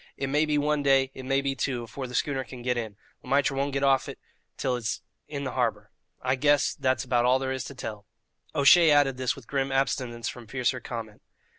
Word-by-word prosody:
It 135 Hz, -, -2 dB
may 150 Hz, +3 st, +2 dB
be 150 Hz, -1 st, +1 dB
one 150 Hz, 0 st, +1 dB
day, 135 Hz, -1 st, +3 dB
it 130 Hz, -, -9 dB
may 135 Hz, +1 st, +2 dB
be 140 Hz, 0 st, -1 dB
two, 125 Hz, -2 st, -2 dB
afore 130 Hz, +3 st, -6 dB
the 125 Hz, -, -7 dB
schooner 135 Hz, -2 st, 0 dB
can 125 Hz, -1 st, -10 dB
get 125 Hz, 0 st, +1 dB
in. 110 Hz, -4 st, -4 dB, 0.3 s
Le -, -, -12 dB
Maître 140 Hz, 0 st, +3 dB
he -, -, -5 dB
won't 140 Hz, +1 st, -1 dB
get 140 Hz, 0 st, -1 dB
off 135 Hz, -1 st, +3 dB
it -, -, -7 dB, 0.4 s
till 130 Hz, -2 st, 0 dB
it's 120 Hz, -1 st, -3 dB, 0.2 s
in 140 Hz, -2 st, -5 dB
th' -, -, -1 dB
harbour. 110 Hz, -5 st, -1 dB, 0.3 s
I 130 Hz, +1 st, +2 dB
guess 145 Hz, +2 st, +3 dB
that's 130 Hz, -2 st, 0 dB
about 120 Hz, -2 st, +1 dB
all 125 Hz, +1 st, +5 dB
there 130 Hz, 0 st, -2 dB
is 130 Hz, -1 st, -3 dB
to 140 Hz, -, -8 dB
tell." 105 Hz, -4 st, -7 dB, 0.5 s
O'Shea 160 Hz, +4 st, +7 dB
added 145 Hz, -3 st, +4 dB
this 130 Hz, -1 st, 0 dB
with 135 Hz, -, -13 dB
grim 135 Hz, +1 st, -1 dB
abstinence 125 Hz, -3 st, -1 dB
from 120 Hz, -3 st, -7 dB
fiercer 125 Hz, +1 st, 0 dB
comment. 115 Hz, -3 st, -7 dB
130 Hz, 235 wpm, -27 LUFS, 125-140 Hz, 0.5 s, O'Shea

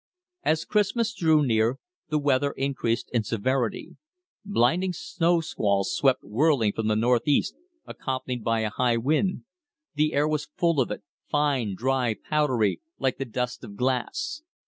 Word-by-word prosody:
As 160 Hz, -, +1 dB
Christmas 220 Hz, +2 st, +1 dB
drew 160 Hz, -7 st, +3 dB
near, 115 Hz, +1 st, +2 dB, 0.3 s
the 155 Hz, -, +1 dB
weather 140 Hz, -1 st, +1 dB
increased 130 Hz, -4 st, -1 dB
in 120 Hz, -, +3 dB
severity. 115 Hz, +3 st, -2 dB, 0.5 s
Blinding 180 Hz, 0 st, +1 dB
snow 170 Hz, 0 st, +1 dB
squalls 100 Hz, -, 0 dB
swept 135 Hz, -7 st, +2 dB
whirling 115 Hz, -1 st, +2 dB
from 110 Hz, -1 st, -2 dB
the 110 Hz, -, +2 dB
northeast, 120 Hz, +5 st, +2 dB, 0.3 s
accompanied 130 Hz, -3 st, -4 dB
by 115 Hz, 0 st, +1 dB
a 110 Hz, -1 st, -1 dB
high 120 Hz, +1 st, +1 dB
wind. 155 Hz, -, 0 dB, 0.5 s
The 150 Hz, 0 st, +1 dB
air 145 Hz, +1 st, +2 dB
was 150 Hz, -1 st, -2 dB
full 170 Hz, -4 st, +2 dB
of 125 Hz, -, -1 dB
it, 105 Hz, -, -5 dB, 0.3 s
fine, 140 Hz, -9 st, +1 dB
dry, 125 Hz, 0 st, 0 dB
powdery, 130 Hz, -10 st, 0 dB, 0.2 s
like 130 Hz, -, -1 dB
the 135 Hz, -, -2 dB
dust 125 Hz, +1 st, -3 dB
of 105 Hz, -4 st, -9 dB
glass. 130 Hz, -, -1 dB
130 Hz, 145 wpm, -26 LUFS, 115-155 Hz, 0.5 s, drew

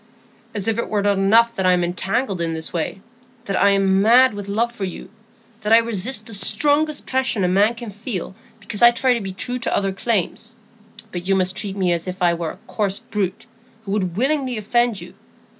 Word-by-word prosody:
"As 205 Hz, -1 st, -2 dB
if 225 Hz, 0 st, +1 dB
it -, -, -3 dB
were 205 Hz, -2 st, 0 dB
not 205 Hz, 0 st, +2 dB
enough 230 Hz, +4 st, +4 dB
that 190 Hz, -5 st, -2 dB
I'm 180 Hz, -1 st, +3 dB
entangled 190 Hz, +3 st, -2 dB
in 165 Hz, -1 st, -1 dB
this 160 Hz, 0 st, -6 dB
way; 175 Hz, +3 st, -3 dB, 0.4 s
that 195 Hz, -, -2 dB
I'm 195 Hz, 0 st, +3 dB
mad 245 Hz, +4 st, +5 dB
with 205 Hz, -1 st, -7 dB
love 230 Hz, +4 st, 0 dB
for 235 Hz, -4 st, -7 dB
you; 185 Hz, 0 st, -6 dB, 0.5 s
that 210 Hz, 0 st, -2 dB
I 225 Hz, -, +9 dB
resist 230 Hz, +2 st, 0 dB
the 230 Hz, -, -8 dB
strongest 290 Hz, +9 st, +2 dB
passion 260 Hz, -6 st, 0 dB
a -, -, +2 dB
man 200 Hz, +5 st, +3 dB
can 235 Hz, -2 st, -8 dB
feel, 205 Hz, -3 st, -5 dB, 0.3 s
because 205 Hz, -1 st, -6 dB
I 240 Hz, -, +9 dB
try 250 Hz, +2 st, +2 dB
to 235 Hz, -, -2 dB
be 195 Hz, -1 st, -5 dB
true 245 Hz, +7 st, -3 dB
to 235 Hz, -, 0 dB
other 195 Hz, -1 st, 0 dB
claims; 225 Hz, +2 st, -2 dB, 0.6 s
but 175 Hz, 0 st, -6 dB
you 195 Hz, -, +3 dB
must 185 Hz, 0 st, 0 dB
treat 195 Hz, -1 st, -3 dB
me 185 Hz, -2 st, +1 dB
as 170 Hz, +1 st, -2 dB
if 185 Hz, 0 st, -4 dB
I 175 Hz, -1 st, +4 dB
were 170 Hz, -1 st, -3 dB
a -, -, -9 dB
coarse 195 Hz, +1 st, -1 dB
brute, 195 Hz, -2 st, -4 dB, 0.4 s
who 195 Hz, -, -5 dB
would 185 Hz, -4 st, -2 dB
willingly 265 Hz, -1 st, 0 dB
offend 235 Hz, +1 st, +1 dB
you. -, -, -11 dB
205 Hz, 210 wpm, -21 LUFS, 190-235 Hz, 0.6 s, I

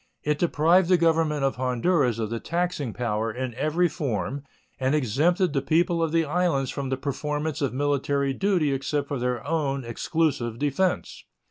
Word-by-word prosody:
It 150 Hz, 0 st, 0 dB
deprived 170 Hz, +2 st, +3 dB
the 180 Hz, -, +6 dB
Government 160 Hz, -3 st, +2 dB
of 135 Hz, -2 st, 0 dB
Honduras 130 Hz, 0 st, +1 dB
of 110 Hz, -1 st, -3 dB
the 115 Hz, -, -2 dB
taxing 170 Hz, -6 st, -2 dB
power 115 Hz, -1 st, -2 dB
in 125 Hz, +1 st, -4 dB
every 155 Hz, +8 st, +1 dB
form 135 Hz, -, -3 dB, 0.4 s
and 130 Hz, +2 st, +1 dB
exempted 155 Hz, -, +1 dB
the 135 Hz, -, +1 dB
people 165 Hz, +4 st, +1 dB
of 165 Hz, -1 st, 0 dB
the 165 Hz, 0 st, +2 dB
islands 150 Hz, -4 st, 0 dB
from 140 Hz, -2 st, -4 dB
the 130 Hz, -, -1 dB
performance 150 Hz, +2 st, -3 dB
of 140 Hz, -, 0 dB
military 140 Hz, 0 st, 0 dB
duty 175 Hz, -4 st, +1 dB
except 140 Hz, +2 st, -2 dB
for 140 Hz, -2 st, -3 dB
their 125 Hz, -1 st, -2 dB
own 140 Hz, -4 st, -1 dB
exclusive 120 Hz, -1 st, -1 dB
defense. 150 Hz, +7 st, -1 dB
145 Hz, 165 wpm, -25 LUFS, 130-165 Hz, 0.4 s, the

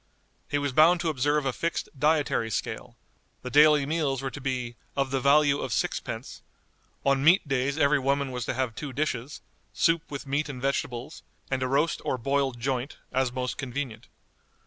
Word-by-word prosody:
He 145 Hz, -, +1 dB
was 140 Hz, -2 st, -2 dB
bound 165 Hz, +5 st, +6 dB
to 165 Hz, -, 0 dB
observe 145 Hz, 0 st, +1 dB
a 135 Hz, -, 0 dB
fixed 170 Hz, +5 st, -2 dB
dietary 145 Hz, -5 st, +1 dB
scale; 110 Hz, -, -4 dB, 0.5 s
the 125 Hz, -, -5 dB
daily 150 Hz, -1 st, +6 dB
meals 140 Hz, -4 st, -1 dB
were 135 Hz, -, -2 dB
to 145 Hz, -, -8 dB
be 125 Hz, -3 st, -3 dB, 0.2 s
"of 135 Hz, -1 st, 0 dB
the 135 Hz, -, +1 dB
value 140 Hz, +1 st, +4 dB
of -, -, -4 dB
sixpence;" -, -, -3 dB, 0.6 s
on 140 Hz, -1 st, +3 dB
meat 170 Hz, +2 st, +5 dB
days 135 Hz, +1 st, 0 dB
every 145 Hz, -1 st, +4 dB
woman 140 Hz, 0 st, 0 dB
was 125 Hz, -2 st, -4 dB
to -, -, -2 dB
have 130 Hz, -3 st, -1 dB
two 140 Hz, +3 st, -6 dB
dishes, 135 Hz, -1 st, -3 dB, 0.3 s
soup 165 Hz, -1 st, +3 dB
with 140 Hz, 0 st, -6 dB
meat 140 Hz, +2 st, -1 dB
and 130 Hz, -3 st, -6 dB
vegetables, 125 Hz, -2 st, -3 dB, 0.3 s
and 130 Hz, -1 st, 0 dB
a 130 Hz, -, +1 dB
roast 145 Hz, +5 st, +1 dB
or -, -, -1 dB
boiled 135 Hz, 0 st, 0 dB
joint, 130 Hz, +2 st, -2 dB
as 130 Hz, -1 st, +1 dB
most 125 Hz, 0 st, -3 dB
convenient. 125 Hz, -3 st, -5 dB
140 Hz, 180 wpm, -27 LUFS, 130-145 Hz, 0.6 s, bound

